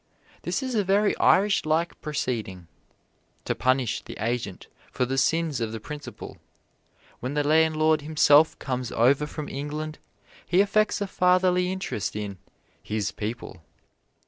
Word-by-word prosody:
This - - -2
is 260 -1 -3
a 210 -3 +2
very 200 +2 +2
Irish 200 +1 +4
like 160 +2 -1
proceeding 115 - -3 0.8
to - - 0
punish 130 -2 0
the - - -10
agent 115 -3 -3 0.3
for 125 - 0
the 130 +2 -2
sins 150 0 +1
of 110 -1 -2
the 115 - -5
principal. 150 +7 -9 0.8
When 130 +4 -4
the 145 -1 +1
landlord 155 0 +3
himself 150 0 +4
comes 125 -2 -4
over 135 +6 +3
from 150 0 -6
England 150 +2 -5 0.4
he 180 - +1
affects 205 +1 +2
a - - +1
fatherly 180 -1 +2
interest 190 - -3
in 100 -3 -5 0.4
"his 105 -1 -2
people." 110 -5 -6
150 Hz, 140 wpm, -26 LUFS, 125-175 Hz, 0.8 s, Irish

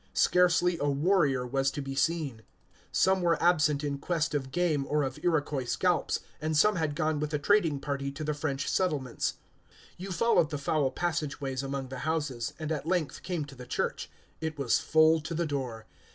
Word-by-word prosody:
Scarcely 180 -1 +3
a 145 - +1
warrior 140 -3 +2
was 135 +2 +1
to 145 - -6
be 135 -1 -4
seen. 140 -4 -1 0.5
Some 190 0 +3
were 170 -1 +2
absent 155 -4 +3
in 140 -1 -2
quest 165 +1 -1
of 135 -3 -2
game 160 -3 +1
or 150 0 +1
of 135 - -4
Iroquois 150 -6 0
scalps, 175 +7 0 0.2
and 155 0 0
some 210 +4 +4
had 155 -3 -1
gone 155 0 0
with 150 0 -2
the 150 - 0
trading 165 -3 +2
party 140 -1 -3
to 155 - -6
the 150 0 -1
French 140 -2 -2
settlements. 145 -10 0 0.6
You 190 +2 -6
followed 175 -3 +3
the 150 - -3
foul 140 0 +1
passage 160 0 -2
ways 135 -2 -3
among 135 -1 -4
the 130 -1 -6
houses, 145 -5 -2
and 155 -1 -4
at 150 0 -3
length 175 -4 -1
came 175 -5 -3
to 145 - -12
the 125 -2 -11
church. - - -2 0.3
It 160 -1 -4
was 140 -4 +2
full 160 0 +4
to 160 +2 -5
the 170 +1 0
door. 130 -7 -4
150 Hz, 195 wpm, -29 LUFS, 140-165 Hz, 0.6 s, some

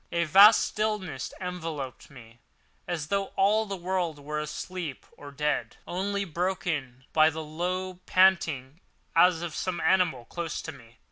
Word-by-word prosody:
A 170 0 +1
vast 195 +7 +8
stillness 210 - -2
enveloped 165 -8 -5
me, 120 -4 -15 0.5
as 160 -3 -3
though 200 0 +1
all 215 +3 +3
the 195 - -3
world 180 -3 -2
were 150 +1 -4
asleep 150 0 -5
or 145 - -11
dead—only 175 - -2
broken 160 -7 -3
by 155 0 +6
the 160 0 -5
low 180 +4 -3
panting 165 -7 +3 0.4
as 170 0 +5
of 170 -2 -4
some 185 -2 -3
animal 165 -10 +2
close 170 +2 -4
to 160 - -5
me. 115 -6 -17
170 Hz, 140 wpm, -27 LUFS, 145-185 Hz, 0.5 s, vast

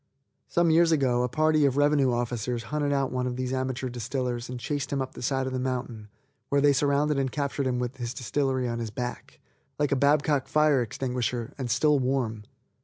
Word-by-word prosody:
Some 170 -1 +2
years 165 +1 +5
ago 130 -6 +2
a 125 - 0
party 155 +3 +2
of 140 -1 +2
revenue 145 -2 +3
officers 120 0 -2
hunted 145 -1 0
out 135 -1 0
one 125 0 -1
of 125 - -3
these 130 0 -3
amateur 130 0 -2
distillers 120 0 -3
and 125 -1 -5
chased 145 +2 -3
him 140 - 0
up 130 -1 -3
the - - -9
side 135 +1 0
of 130 - -3
the 130 - -1
mountain, 125 -4 -3 0.4
where 140 - +3
they 145 0 +5
surrounded 140 +1 +2
and 135 -2 -1
captured 140 -1 -2
him 125 -1 0
with 125 +1 -3
his 120 -1 -4
distillery 130 0 -1
on 115 0 -3
his 115 -2 -3
back, 120 +3 -6 0.4
like 145 -1 0
a - - +3
Babcock 145 0 +2
fire 150 -3 +3
extinguisher, 120 0 -3
and 130 -3 -3
still 145 +4 +3
warm. 125 -5 -1
130 Hz, 205 wpm, -27 LUFS, 125-145 Hz, 0.4 s, years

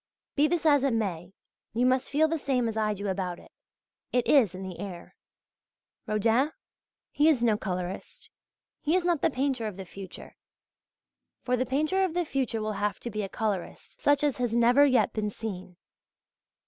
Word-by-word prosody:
Be 295 +1 +4
this 345 0 -1
as 290 -3 +5
it 270 -4 +2
may, 180 -5 -2 0.4
you 240 +3 +2
must 255 0 +2
feel 305 +2 +3
the 325 0 -1
same 255 -4 0
as 225 - -3
I 215 -1 0
do 200 +1 -5
about 185 -2 -2
it - - -17 0.6
it 245 -1 +1
is 230 - +4
in 190 - -6
the 185 -2 -7
air. 180 -4 -8 0.9
Rodin? 225 +7 +2 0.6
He 300 +2 +4
is 265 -7 +2
no 225 -3 +4
colourist. 185 -3 -5 0.5
He 315 +3 +1
is 365 -1 +1
not 345 -5 +1
the - - +3
painter 260 -4 -1
of 205 -3 -6
the 190 - -7
future. 190 +1 -10 1.1
For 250 - +1
the 255 0 -1
painter 310 +8 +1
of 355 -3 -1
the 355 -1 +1
future 250 -6 -1
will 215 0 -2
have 205 -2 -1
to 235 - -5
be 215 0 -2
a 195 - -4
colourist 205 -5 -4
such 290 0 +3
as 290 -3 +1
has 240 -2 -1
never 240 +4 +5
yet 255 -3 +3
been 210 -1 -1
seen. 185 -4 -7
235 Hz, 185 wpm, -28 LUFS, 200-280 Hz, 1.1 s, as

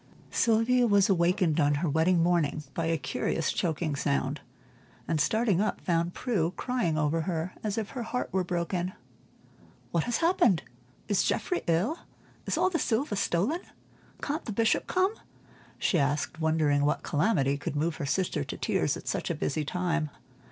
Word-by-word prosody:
Sylvia 235 +2 +3
was 205 -2 +4
awakened 175 -3 +2
on 145 -1 +3
her 160 +4 -1
wedding 165 +3 +3
morning 165 -3 +1
by 165 -1 -1
a 165 0 +1
curious 165 +2 -1
choking 160 -3 -1
sound, 140 0 -1 0.7
and 155 -3 +1
starting 215 +2 +2
up 215 - -1
found 170 0 0
Prue 185 -9 -1
crying 240 -11 0
over 155 +2 +1
her 170 0 -2
as 210 -1 -2
if 215 -2 -2
her 255 - -4
heart 245 +2 -2
were 190 -1 +2
broken. 175 +1 -2 1.0
"What 170 -2 +1
has 240 - 0
happened? 235 - +3 0.4
Is 205 -3 +2
Geoffrey 360 - 0
ill? 185 - +1 0.5
Is - - 0
all 370 - +2
the 335 - 0
silver 230 -1 0
stolen? 200 - 0 0.6
Can't 300 +2 -2
the - - -4
Bishop 225 +2 +1
come?" 375 +3 +2 0.6
she 175 - +1
asked, 145 +3 -1
wondering 155 -3 +2
what 145 - +1
calamity 145 -4 +1
could 145 0 -4
move 160 +2 0
her 145 - -3
sister 180 - 0
to - - -6
tears - - 0
at - - -12
such - - -2
a - - -1
busy 115 - -1
time. 165 0 -1
175 Hz, 165 wpm, -28 LUFS, 155-220 Hz, 1.0 s, was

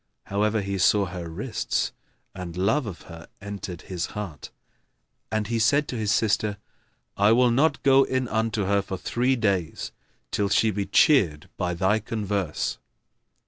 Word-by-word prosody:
However, 105 +2 0
he 100 0 -3
saw 100 +2 +4
her 85 -2 -6
wrists 105 +7 -2 0.4
and 90 -3 -7
love 110 +8 +1
of 95 -5 -7
her 85 -2 -11
entered 100 -4 -7
his 90 -3 -3
heart; 95 -8 -6 0.8
and 110 -1 0
he 115 +1 -1
said 145 +7 +3
to - - -3
his 110 -3 0
sister, 105 -1 +1 0.6
"I 100 +2 +5
will 125 +1 +4
not 140 +4 +2
go 135 0 +6
in 130 -1 -1
unto 110 -1 0
her 100 +1 +2
for 95 -1 -5
three 125 +7 0
days, 100 -8 -1 0.4
till 100 -1 0
she 110 +2 +3
be 100 -1 -3
cheered 95 - +3
by 90 -1 -2
thy 95 +5 +2
converse." 100 -6 -2
105 Hz, 155 wpm, -25 LUFS, 95-115 Hz, 0.8 s, go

